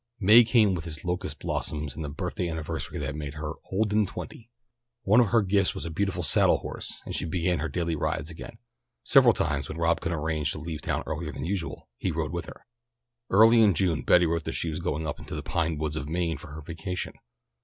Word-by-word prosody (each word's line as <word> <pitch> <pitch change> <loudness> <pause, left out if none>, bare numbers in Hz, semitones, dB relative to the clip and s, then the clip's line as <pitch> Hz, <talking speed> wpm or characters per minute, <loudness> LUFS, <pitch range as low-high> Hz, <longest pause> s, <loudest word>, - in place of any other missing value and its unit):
May 110 +4 +8
came 110 -4 +4
with 85 -2 -4
its 80 +1 -6
locust 90 0 -2
blossoms 75 -3 -3
and 80 - -5
the 75 - -4
birthday 90 +3 -3
anniversary 80 -2 -4
that 65 -2 -3
made 75 -1 -6
her 75 +1 -4 0.2
"old 105 +2 +1
and 105 -2 +3
twenty." 115 +4 -8 0.5
One 110 +3 +5
of 120 - +5
her 115 +1 +3
gifts 100 0 +2
was - - -5
a 85 - -4
beautiful 95 +3 -1
saddle - - +4
horse, - - -7
and - - -4
she - - +1
began 85 0 0
her 80 +2 -2
daily 85 +2 -1
rides 75 +1 -2
again. 80 - -9 0.5
Several - - +6
times 70 -2 -1
when 80 - -6
Rob 85 0 +1
could 85 - -2
arrange 80 -1 -1
to - - -6
leave 80 0 -5
town - - -2
earlier 75 0 -4
than 70 +1 -5
usual 90 -3 -4
he - - -2
rode - - -2
with - - -4
her. - - -12 0.6
Early 115 +4 +7
in 100 -5 +5
June 80 -4 +1
Betty 90 +6 +5
wrote 85 -1 -1
that - - -3
she 80 - -2
was 75 - -4
going 80 +2 -2
up 75 - -4
into - - -7
the - - -4
pine 85 -2 -1
woods 75 0 -2
of 75 -1 -4
Maine 85 0 -1
for 85 - -11
her 80 - -7
vacation. 85 +4 -5
85 Hz, 230 wpm, -27 LUFS, 75-95 Hz, 0.6 s, May